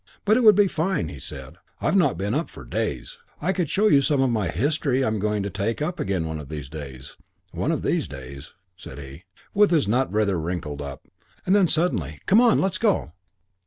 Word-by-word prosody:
'But 215 +1 +4
it 255 - +3
would 215 -2 +8
be 205 0 +5
fine,' 165 - -1
he 70 - -9
said. 65 -1 -9 0.2
'I've - - 0
not - - +3
been 100 +3 -2
up 155 +5 -1
for - - -12
days. - - -4 0.2
I 190 - 0
could 180 -6 -1
show 210 +2 +2
you 140 -9 +5
some 140 0 +1
of 130 -2 +2
my 105 -5 0
history 135 - 0
I'm 110 -2 -1
going 105 0 0
to 100 - -4
take 105 +3 -2
up 170 +4 -3
again 95 -4 -1
one 80 -1 -4
of 70 -3 -9
these 75 -3 -6
days 70 -4 -9 0.3
one - - -1
of - - -2
these - - 0
days,' 70 +1 -10 0.2
said 65 - -11
he, 70 +5 -10 0.3
with 205 0 +5
his 160 - +2
nut 125 +5 +1
rather 105 -4 +1
wrinkled 80 -3 -4
up. 70 -1 -8 0.4
And 190 - +3
then 195 -3 +5
suddenly, 95 - 0
'Come 215 +5 +5
on, 240 -3 +4
let's 190 -1 0
go!' 205 - +1
105 Hz, 220 wpm, -24 LUFS, -, 0.4 s, would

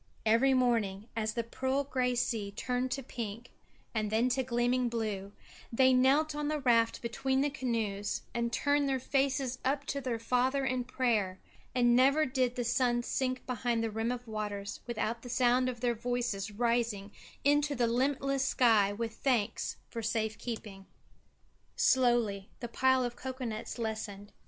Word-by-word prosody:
Every 240 +5 +4
morning, 225 -6 +1
as 220 -1 -1
the 235 - 0
pearl 260 +4 -1
grey 255 -2 0
sea 225 -4 -1
turned 250 +4 -2
to 270 +1 -3
pink 235 -1 -6 0.4
and 215 -2 -1
then 225 +4 +2
to 260 +1 +1
gleaming 245 0 +1
blue, 210 -4 -3 0.4
they 260 +2 +5
knelt 275 +5 +4
on 295 0 -2
the 305 0 -1
raft 235 -4 +2
between 265 +3 0
the 290 0 +1
canoes 225 -7 -2
and 235 0 -1
turned 285 +2 +1
their 265 -1 +1
faces 265 -1 0
up 275 +1 0
to 280 - -3
their 245 -3 -2
Father 255 +4 +1
in 255 -2 -1
prayer, 220 -7 0 0.4
and 240 -1 +4
never 275 +5 +5
did 255 -2 0
the 245 - -1
sun 240 0 +1
sink 255 +1 -2
behind 240 -2 -1
the 225 - -1
rim 225 +2 -1
of 245 -1 -5
waters 210 -2 -4
without 230 0 -2
the 245 - -9
sound 250 +1 +3
of 240 -2 -6
their 245 -1 +2
voices 235 -3 -2
rising 230 -2 0 0.3
into 290 0 +3
the 240 -2 +2
limitless 270 +3 +1
sky 225 -7 +4
with 225 +2 -4
thanks 235 -4 0
for 230 - -5
safe 220 -1 -1
keeping. 210 -5 -7 0.9
Slowly 240 -6 +2
the 240 - -4
pile 260 +2 +3
of 245 -1 -3
cocoa 260 0 -5
nuts 220 +1 -5
lessened. 215 -3 -4
240 Hz, 165 wpm, -31 LUFS, 225-260 Hz, 0.9 s, they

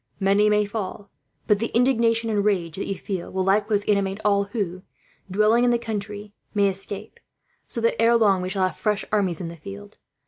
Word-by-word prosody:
Many 200 +2 +3
may 210 0 +3
fall, 205 -1 -6 0.3
but 210 -1 +3
the 230 - 0
indignation 230 -2 +2
and 205 -1 +1
rage 180 -6 0
that - - -3
you 195 - -3
feel 190 -4 -5
will 190 0 -1
likewise 205 +2 +2
animate 200 -1 +1
all 200 -1 +3
who, 200 -4 -4 0.5
dwelling 215 +5 +3
in 245 - +4
the 240 - +3
country, 210 -2 -5 0.2
may 200 -1 +4
escape; 195 +2 -5 0.5
so - - -3
that, 230 0 +1
ere 235 +1 +5
long, 200 -5 +3
we 185 - -3
shall 190 -1 +1
have 185 - -3
fresh 210 -1 -1
armies 190 -6 +1
in 175 - -4
the 170 - -7
field. 200 +5 -11
205 Hz, 200 wpm, -24 LUFS, 195-215 Hz, 0.5 s, ere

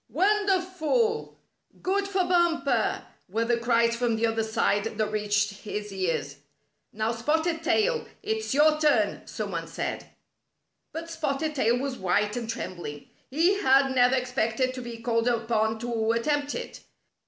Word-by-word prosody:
"Wonderful! 390 - +1 0.4
Good 395 +2 0
for 390 -2 +1
Bumper!" 345 -2 +1 0.2
were 225 +4 0
the 235 0 +2
cries 235 0 +2
from 235 -1 0
the 225 +1 +1
other 225 0 0
side 220 -2 +1
that 215 -1 0
reached 205 -1 0
his 210 -1 -5
ears. 185 -3 -2 0.5
"Now 220 +1 -1
Spotted 320 +8 0
Tail, 465 +8 +1 0.2
it's 440 +1 -2
your 305 +2 +4
turn!" 300 -1 +2
some - - -4
one - - -4
said. - - -4 0.8
But 330 +1 -6
Spotted 310 -1 -2
Tail 240 -4 +2
was 265 0 -3
white 205 +3 +1
and 235 -2 -4
trembling. 175 -9 -6 0.2
He 345 +9 +2
had 270 -2 +4
never 250 0 +4
expected 255 0 0
to 255 - -6
be 240 -1 -7
called 230 0 0
upon 225 -2 +1
to 230 -2 0
at 230 0 -1
tempt 290 0 0
it. - - -6
250 Hz, 150 wpm, -27 LUFS, 225-325 Hz, 0.8 s, your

